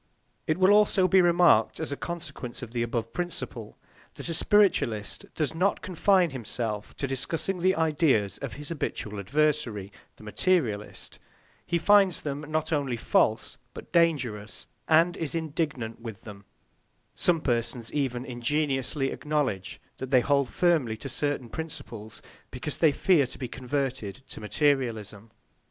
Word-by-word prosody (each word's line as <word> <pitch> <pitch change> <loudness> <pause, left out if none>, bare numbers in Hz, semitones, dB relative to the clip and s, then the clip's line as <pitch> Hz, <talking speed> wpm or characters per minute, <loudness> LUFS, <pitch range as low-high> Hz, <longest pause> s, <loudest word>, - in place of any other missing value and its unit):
It 155 - +1
will 185 +1 +5
also 205 -3 +5
be 190 +1 +5
remarked, 175 0 +4
as 160 -2 -3
a - - -1
consequence 145 -8 -6
of 115 - -8
the 120 -1 -2
above 115 -1 -2
principle, 175 +2 -4 0.4
that - - -4
a - - -1
spiritualist 160 - +2
does 155 -2 -1
not 185 +5 0
confine 185 -1 +3
himself 110 -4 -4
to 140 - -2
discussing 155 +8 -2
the 185 +2 +3
ideas 150 - +2
of - - -5
his 150 0 -8
habitual 105 -9 -4
adversary, 120 -4 0 0.2
the - - -16
materialist; 110 - -1 0.5
he 170 - +1
finds 195 0 +4
them 145 -1 -3
not 155 +1 -1
only 140 -5 0
false, 110 -1 +1 0.2
but - - -10
dangerous, 130 -11 0 0.2
and 165 +2 +4
is 160 -1 -3
indignant 150 -8 -3
with 110 -4 -8
them; 100 -2 -11 0.7
some 175 -2 +2
persons 120 -3 -2
even 130 -4 -1
ingenuously 135 +2 -1
acknowledge 145 -11 -2 0.2
that 130 - -5
they 130 -2 +5
hold 140 -1 +2
firmly 155 -11 +1
to 135 - -7
certain 145 -1 -2
principles 115 -7 -8 0.3
because 135 +2 -5
they 160 -3 +5
fear 155 -3 +3
to - - -10
be 130 - -4
converted 130 -3 -3
to - - -9
materialism. 115 -5 -1
140 Hz, 145 wpm, -27 LUFS, 115-165 Hz, 0.7 s, will